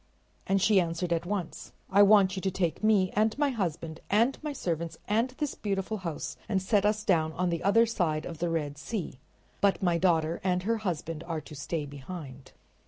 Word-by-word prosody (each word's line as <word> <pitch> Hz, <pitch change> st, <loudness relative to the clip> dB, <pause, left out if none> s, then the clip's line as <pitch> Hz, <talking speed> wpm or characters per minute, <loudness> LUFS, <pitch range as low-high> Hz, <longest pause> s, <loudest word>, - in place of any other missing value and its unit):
And 195 Hz, 0 st, +3 dB
she 195 Hz, 0 st, +4 dB
answered 170 Hz, +1 st, -1 dB
at 170 Hz, +1 st, -2 dB
once: 195 Hz, -4 st, -4 dB, 0.2 s
"I 200 Hz, +1 st, +6 dB
want 200 Hz, -2 st, +6 dB
you 190 Hz, -, -4 dB
to 190 Hz, -, 0 dB
take 185 Hz, 0 st, -2 dB
me 205 Hz, -4 st, +3 dB
and 220 Hz, +3 st, +1 dB
my 290 Hz, -1 st, +2 dB
husband 165 Hz, -, -3 dB
and 230 Hz, +6 st, +3 dB
my 300 Hz, -1 st, -3 dB
servants 170 Hz, -, -3 dB
and 225 Hz, +5 st, +2 dB
this 295 Hz, -3 st, -2 dB
beautiful 200 Hz, +1 st, -2 dB
house 170 Hz, -6 st, -5 dB
and 195 Hz, -, +2 dB
set 200 Hz, +1 st, +2 dB
us 210 Hz, 0 st, 0 dB
down 160 Hz, -5 st, +2 dB
on 180 Hz, +1 st, 0 dB
the 170 Hz, -, -2 dB
other 215 Hz, +5 st, +5 dB
side 165 Hz, -9 st, -1 dB
of 165 Hz, -2 st, -7 dB
the 175 Hz, 0 st, 0 dB
Red 150 Hz, -3 st, -2 dB
Sea, 165 Hz, -, -5 dB, 0.4 s
but 200 Hz, -1 st, +2 dB
my 175 Hz, -2 st, +2 dB
daughter 165 Hz, -2 st, +2 dB
and 180 Hz, -1 st, +1 dB
her 230 Hz, +3 st, +1 dB
husband 165 Hz, -6 st, -3 dB
are 165 Hz, -2 st, -3 dB
to 150 Hz, -, -12 dB
stay 150 Hz, +2 st, -3 dB
behind." 140 Hz, -2 st, -9 dB
185 Hz, 200 wpm, -29 LUFS, 165-210 Hz, 0.4 s, I